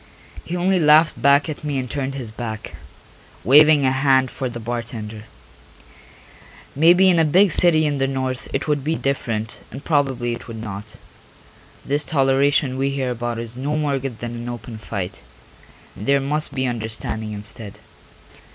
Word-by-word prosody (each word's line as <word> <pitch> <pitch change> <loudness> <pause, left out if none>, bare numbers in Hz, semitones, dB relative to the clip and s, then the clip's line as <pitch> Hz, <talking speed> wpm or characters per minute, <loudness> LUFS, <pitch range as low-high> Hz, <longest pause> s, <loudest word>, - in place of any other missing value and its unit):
He 175 - -5
only 185 +1 +2
laughed 155 0 +4
back 140 +1 +4
at 155 -1 -6
me 145 -2 -2
and 130 -1 -3
turned 135 +1 -3
his 125 -5 -5
back, 110 -6 -6 0.7
waving 150 +2 +6
a 130 - +3
hand 135 -1 +2
for 130 - -4
the 120 -1 -7
bartender. 110 -2 -6 1.5
Maybe 175 +6 +5
in 175 -3 +4
a - - +5
big 180 +5 +4
city 160 -3 +4
in 145 -2 -1
the 135 - +1
North 130 -1 -3
it 135 - -2
would 145 -2 0
be 160 +3 0
different 115 -6 -3
and 135 +3 -10
probably 135 -6 0
it 120 - -8
would 115 -1 -7
not: 105 -1 -7 0.9
this 145 +2 0
toleration 135 -1 +2
we 135 +1 +1
hear 135 -2 -2
about 120 -1 -3
is 115 0 -7
no 140 +4 -2
more 145 -3 0
good 130 -3 -5
than 120 0 -5
an 120 0 -6
open 115 -1 -7
fight, 95 -3 -5 0.7
and 105 - -8
there 140 0 +4
must 150 +3 -1
be 130 -1 0
understanding 110 -2 -3
instead. 105 0 -1
135 Hz, 170 wpm, -21 LUFS, 115-145 Hz, 1.5 s, waving